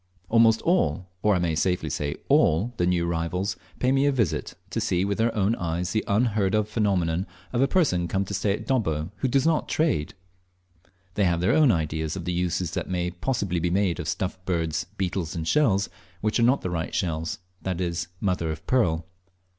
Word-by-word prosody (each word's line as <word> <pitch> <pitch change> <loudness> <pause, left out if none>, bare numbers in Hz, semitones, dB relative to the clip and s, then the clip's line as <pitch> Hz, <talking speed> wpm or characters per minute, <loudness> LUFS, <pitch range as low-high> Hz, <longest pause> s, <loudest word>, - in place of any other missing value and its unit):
Almost 115 -1 +4
all, 90 - +1 0.2
or 105 -1 +3
I - - +2
may 85 -2 0
safely 90 +3 0
say 70 0 -2
all, 95 +11 +3
the 90 - +1
new 85 -1 +1
arrivals 90 +4 -1 0.2
pay 125 - +1
me 135 +1 +3
a - - +4
visit, 115 - -1 0.2
to - - -1
see 90 +1 +1
with 100 +1 -2
their 115 +1 +3
own 105 +1 +2
eyes 85 +1 -2
the 110 - 0
unheard 105 -2 +2
of 105 -1 +1
phenomenon 95 -5 0 0.3
of 120 - +1
a 135 - +4
person 110 - +2
come 95 +2 0
to 100 - -6
stay 100 0 +1
at - - -5
Dobbo 80 - 0
who 130 - 0
does 135 +1 +2
not 160 -2 +1
trade! 155 - 0 1.0
They 100 - +2
have 85 -1 +2
their 90 - +2
own 150 -5 +5
ideas 80 -3 -1
of 90 -3 -5
the 90 - -1
uses 90 -1 -1
that - - -3
may 90 -1 -1
possibly 90 -1 -1
be 85 +1 0
made 95 -1 +1
of 80 - -4
stuffed 95 +2 -3
birds, 80 -3 -1
beetles, 95 -3 -2
and 80 -1 -3
shells 105 - +3 0.3
which 110 +2 +1
are 115 +1 +5
not 135 - +2
the 90 - -3
right 80 -2 -3
shells 80 -3 -1 0.2
that 90 -2 -3
is, 85 -1 -2
"mother 90 -5 0
of 80 -1 -5
pearl." 85 -11 +1
95 Hz, 205 wpm, -25 LUFS, 85-110 Hz, 1.0 s, own